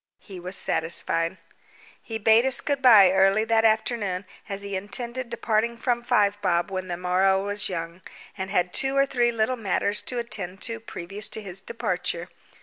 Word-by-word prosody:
He 190 -3 -11
was 180 +2 -4
satisfied. 165 +1 0 0.6
He 225 - -5
bade 220 +2 +5
us 265 0 +2
good 285 -2 -2
bye 215 -8 +8
early 195 +3 +4
that 225 0 +2
afternoon, 215 -4 +1 0.2
as 200 0 -4
he 200 -1 -4
intended 235 +6 -5
departing 235 0 0
from 240 0 0
Five 205 -4 +1
Bob 170 0 +1
when 185 -1 -4
the 175 -1 -4
morrow 190 +2 +2
was 205 0 -2
young, 170 0 -5 0.3
and 190 -1 -5
had 180 -3 0
two 270 +1 +1
or 275 - +5
three 240 -3 +1
little 230 +2 0
matters 205 -1 -1
to 250 - -4
attend 205 -6 -4
to 230 0 -3
previous 200 -1 -7
to 220 - -5
his 190 -1 -6
departure. 180 -5 -3
205 Hz, 175 wpm, -25 LUFS, 185-230 Hz, 0.6 s, bye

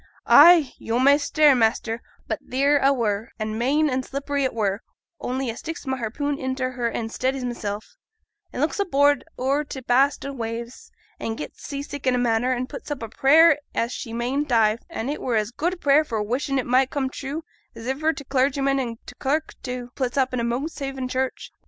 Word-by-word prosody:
Ay! 320 -3 +7
yo' 225 +1 -1
may 275 +3 +6
stare, 300 0 +4
master, 230 -1 +1 0.3
but - - -2
theere 280 +3 +3
a 275 - +5
were, 225 -4 -1
an' 215 -1 -3
main 280 +7 +2
an' 260 -2 0
slippery 280 +2 -3
it 260 - +1
were, 205 -1 0 0.4
only 260 +1 -2
a - - -9
sticks 325 +5 -7
my 265 -1 -1
harpoon 280 +5 -2
intil 260 0 -2
her 245 -2 -1
an' 225 0 -3
steadies 260 +2 -2
mysel', 210 -4 -3 0.7
an' - - -4
looks - - 0
abroad 285 -7 +3
o'er 275 +4 +1
t' 280 -2 -7
vast 270 +4 +3
o' 275 - -4
waves, 235 0 -6 0.3
and 225 0 -3
gets - - -8
sea 280 -1 -5
sick 285 -2 -6
in 255 - +4
a - - +1
manner, 245 +1 +1
an' 255 0 -1
puts 280 +3 -9
up 290 -5 -4
a 225 - -5
prayer 300 +6 +5 0.2
as 230 +1 0
she 230 - -6
mayn't 255 +5 -1
dive, 225 -2 +3
and 275 -5 -3
it 295 - -5
were 245 - -1
as 215 +1 0
good 335 +8 -1
a - - -17
prayer 290 -1 +4
for 230 -8 -3
wishin' 270 +5 -1
it 260 - 0
might 255 +2 +3
come 275 -2 -1
true 280 +4 -5 0.3
as 225 - -8
iver 295 +5 +1
t' 295 - -8
clargyman 275 +1 +1
an' 235 -3 -3
t' - - -10
clerk 305 +4 -1
too 250 -2 -5
puts 255 -1 -2
up 265 -1 +3
i' - - 0
Monkshaven 270 +2 -3
church. 260 0 -3
260 Hz, 210 wpm, -24 LUFS, 235-285 Hz, 0.7 s, Ay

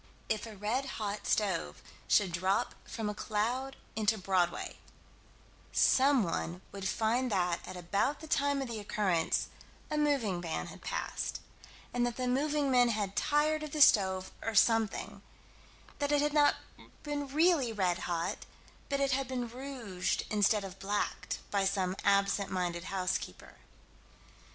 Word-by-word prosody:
If 220 +1 -1
a 215 -2 -10
red 235 +7 -1
hot 205 -1 -3
stove 185 - 0 0.3
should 190 -4 +3
drop 190 +7 0
from 225 -2 -4
a 210 - -1
cloud 240 +6 -2 0.2
into 220 0 +2
Broadway, 185 -3 0 0.9
someone 215 -10 +2
would 195 -1 -4
find 235 +3 +1
that 180 -3 +1
at 185 - -7
about 200 +11 0
the 315 - -9
time 285 -2 +1
of - - -5
the 230 -2 -5
occurrence, 195 -5 0 0.4
a 300 - +1
moving 250 -12 +1
van 165 -2 -3
had - - -14
passed, - - -3 0.5
and 245 0 +1
that 240 - -4
the 255 -1 -1
moving 285 +2 +1
men 245 -1 +5
had 205 -3 -1
tired 305 +1 +2
of 305 -1 -6
the 305 - -2
stove, 190 -6 +5
or 225 - -3
something 225 0 +2 0.8
that 285 0 0
it 290 0 +3
had 295 0 0
not 295 -1 +5 0.5
been 290 -1 -3
really 300 -3 +3
red 185 -5 0
hot, 170 -1 -3 0.4
but 280 0 0
had 275 -1 +1
been 250 -2 -2
rouged 240 -7 -3
instead 210 0 +3
of 195 -1 -8
blacked, 205 +1 -2
by 200 -1 +2
some 190 -1 0
absent 200 0 +2
minded 175 -2 -2
housekeeper. 185 -1 -3
215 Hz, 145 wpm, -32 LUFS, 190-270 Hz, 0.9 s, men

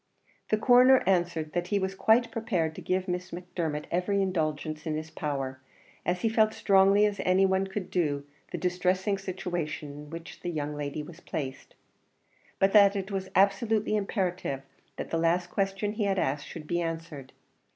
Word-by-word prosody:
The 215 - +3
Coroner 250 +3 +6
answered 175 -4 +1
that 175 0 -1
he 205 - +1
was 190 -1 -1
quite 230 +4 +3
prepared 210 -9 -1
to - - -9
give 185 +1 -1
Miss 180 0 -3
Macdermot 170 -4 -4
every 185 +3 +1
indulgence 155 -4 -1
in 155 - -1
his 155 +1 -5
power, 135 -4 -3 0.5
as 180 0 0
he - - +2
felt 220 -1 +4
as - - -12
strongly 195 +1 +5
as 205 -1 -1
any 185 +1 +4
one 190 0 +1
could 190 -1 -5
do 145 -5 0 0.3
the - - -3
distressing 185 +2 0
situation 175 -6 -4
in 145 +1 -10
which 165 +1 -9
the 175 - -4
young 150 -3 -3
lady 145 +1 -4
was 160 +1 -11
placed, 135 -5 -6 0.8
but 195 0 +3
that 200 -1 +7
it 195 0 -3
was 190 -1 -3
absolutely 210 +3 +3
imperative 185 - -2 0.3
that - - -6
the 165 - +1
last 175 +2 +1
question 195 +1 -1
he 215 -1 -1
had 195 -1 +1
asked 145 -4 -1
should 160 -2 -8
be 175 +2 -1
answered. 165 -5 -5
180 Hz, 180 wpm, -28 LUFS, 160-195 Hz, 0.8 s, that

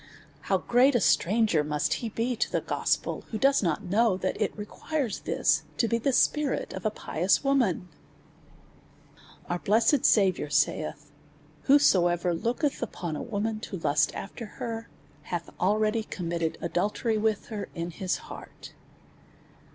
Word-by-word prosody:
How - - +4
great 255 +3 +3
a - - +5
stranger 175 +1 +3
must 150 0 0
he 230 - -3
be 235 +3 -1
to - - -1
the - - +1
gospel, - - -1
who 220 - -3
does 275 +5 +3
not 170 +1 -1
know 205 +1 +2
that 185 0 -2
it 210 - -1
requires 235 +3 -3
this - - +1 0.2
to 230 - +2
be 230 +1 0
the 275 +4 +1
spirit 295 +2 +1
of - - -2
a - - +2
pious 185 - 0
woman! 250 - +1 1.6
Our 175 - -2
blessed 230 +9 +3
Saviour 190 -7 +3
saith. 150 -1 0 0.5
Whosoever 180 - +4
looketh 245 - -1
upon 175 -8 -4
a - - -4
woman 215 0 -2
to 205 -3 -6
lust 150 -3 +2
after 220 +3 -7
her, 230 -1 -5 0.3
hath 170 +2 -5
already 215 +4 +2
committed 170 -5 -3
aduUery 210 +5 0
with 220 -1 0
her 215 -3 -5
in 170 +1 -4
his 185 +2 -2
heart. - - -11
210 Hz, 145 wpm, -27 LUFS, 175-230 Hz, 1.6 s, a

